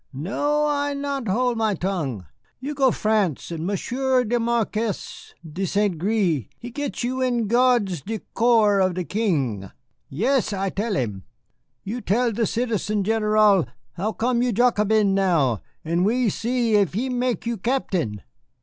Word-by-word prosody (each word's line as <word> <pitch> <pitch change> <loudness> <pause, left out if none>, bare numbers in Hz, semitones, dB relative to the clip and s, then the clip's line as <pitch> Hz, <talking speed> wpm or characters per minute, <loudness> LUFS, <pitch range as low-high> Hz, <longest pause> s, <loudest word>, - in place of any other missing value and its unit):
No, 290 - 0
I 285 -1 0
not 280 -3 -3
hold 240 +4 +1
my 215 -2 +1
tongue. 155 - -3 0.3
You 280 +4 -4
go 270 -2 +3
France 210 - 0
and 165 0 -3
Monsieur 255 +6 0
le 240 +1 0
Marquis 230 -2 -2
de 165 +5 -4
St. 200 0 +1
Gré 180 - +1
he 240 - -8
get 285 0 -4
you 255 +2 -2
in 245 -3 +1
gardes 235 - +2
du 220 +9 -4 0.2
corps 225 -4 +4
of 185 -2 +2
the 180 - -2
King. 140 - -1 0.4
Yes, 230 - +1
I 195 -1 -1
tell 210 +1 -2
him. 105 - -3 0.6
You 235 +5 -4
tell 235 +4 +1
the 225 0 0
Citizen 215 -3 -1
General 215 - +3 0.3
how 200 +6 -2
come 235 +2 0
you 245 0 +1
Jacobin 215 -3 +3
now, 165 - +2 0.2
and 170 +2 +1
we 235 +3 +2
see 235 +2 0
if 195 -3 +1
he 245 +5 0
mek 245 -4 -1
you 235 0 -2
Captain." 185 - -1
215 Hz, 155 wpm, -23 LUFS, 185-245 Hz, 0.6 s, corps